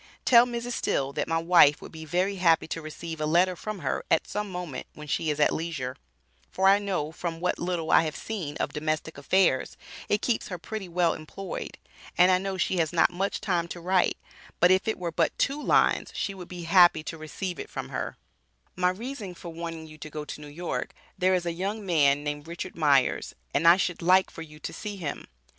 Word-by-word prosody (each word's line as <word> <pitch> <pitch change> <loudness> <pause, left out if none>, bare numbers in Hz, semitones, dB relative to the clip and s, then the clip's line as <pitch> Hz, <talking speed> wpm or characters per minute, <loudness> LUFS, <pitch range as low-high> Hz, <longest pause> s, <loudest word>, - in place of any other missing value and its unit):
Tell 240 -1 +7
Mrs 240 0 -4
Still 140 - -1
that - - -2
my 165 - +1
wife 165 -3 +5
would - - -11
be 160 -1 -9
very 185 +5 0
happy 165 -3 +3
to 165 - -3
receive 160 +1 -7
a 155 - 0
letter 180 +3 +3
from 215 +4 -5
her 130 - -1
at - - +2
some 210 0 -3
moment 180 -7 -5
when 150 0 -10
she 155 +2 -1
is 150 0 -1
at 150 - +4
leisure, 145 -6 -3 0.5
for 190 +1 +2
I 200 +1 +6
know 185 -7 -2
from 165 0 -5
what 180 +1 -1
little 175 -2 -2
I - - +7
have 155 -1 -3
seen 180 -10 -5
of - - -2
domestic 155 0 -2
affairs 170 -2 +2 0.3
it 210 - +1
keeps 240 - 0
her 180 - -5
pretty 195 +2 -6
well 170 -1 +2
employed, 180 +4 -7 0.4
And 180 +1 +6
I 185 - +4
know 195 0 -3
she 185 +1 0
has 160 -3 +1
not 170 0 +4
much 195 +3 -2
time 175 -4 0
to 175 - -7
write 180 +1 +2 0.4
but 180 +1 +6
if 190 +3 +3
it 220 - 0
were 175 -2 -3
but - - 0
two 285 +2 0
lines, - - +2
she 200 - -2
would 180 -2 -9
be 180 -1 -7
happy 175 -2 +5
to 165 - -5
receive 170 +3 -5
it - - -6
from - - -6
her, - - -4 0.6
my 180 0 +2
reason 210 -1 -6
for 170 - -9
wanting 165 -1 -6
you 155 -1 -13
to 155 - -8
go 150 0 -6
to 150 - -8
New 150 - -9
York, 170 +4 -4 0.2
there 185 0 +3
is 180 -1 -1
a 170 - -1
young 200 +4 -3
man 145 -5 +3
named 145 +1 -4
Richard 170 +2 -6
Myers 140 -5 +2 0.2
and 155 +4 +2
I 170 +2 +9
should 180 -3 -1
like 185 +2 +4
for - - -9
you 150 -2 -10
to - - -5
see 205 -2 -6
him. 160 -6 -5
175 Hz, 225 wpm, -27 LUFS, 155-190 Hz, 0.6 s, I